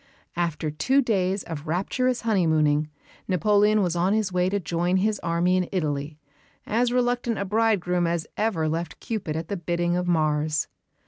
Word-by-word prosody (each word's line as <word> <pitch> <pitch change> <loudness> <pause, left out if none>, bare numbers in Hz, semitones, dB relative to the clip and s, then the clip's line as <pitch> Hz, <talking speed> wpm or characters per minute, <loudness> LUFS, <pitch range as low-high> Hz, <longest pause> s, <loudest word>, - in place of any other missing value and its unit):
After 165 -3 -1
two 265 - +2
days 195 -4 0
of 160 -2 -7
rapturous 245 +9 0
honeymooning 155 -8 +2 0.4
Napoleon 205 +3 +3
was 175 -2 0
on 180 +3 +2
his 215 -4 0
way 180 0 +2
to 200 +1 0
join 175 +1 0
his 210 +2 +1
army 170 +2 +1
in 180 -1 -1
Italy, 150 -4 -2 0.5
as 240 +3 +1
reluctant 245 -2 0
a 200 - -2
bridegroom 190 -5 +1
as 170 -1 -1
ever 195 -8 0
left 165 +2 -3
Cupid 205 -9 -4
at 160 0 -4
the 200 - -3
bidding 175 0 -1
of 180 0 -1
Mars. 155 -2 +1
180 Hz, 160 wpm, -25 LUFS, 165-210 Hz, 0.5 s, Napoleon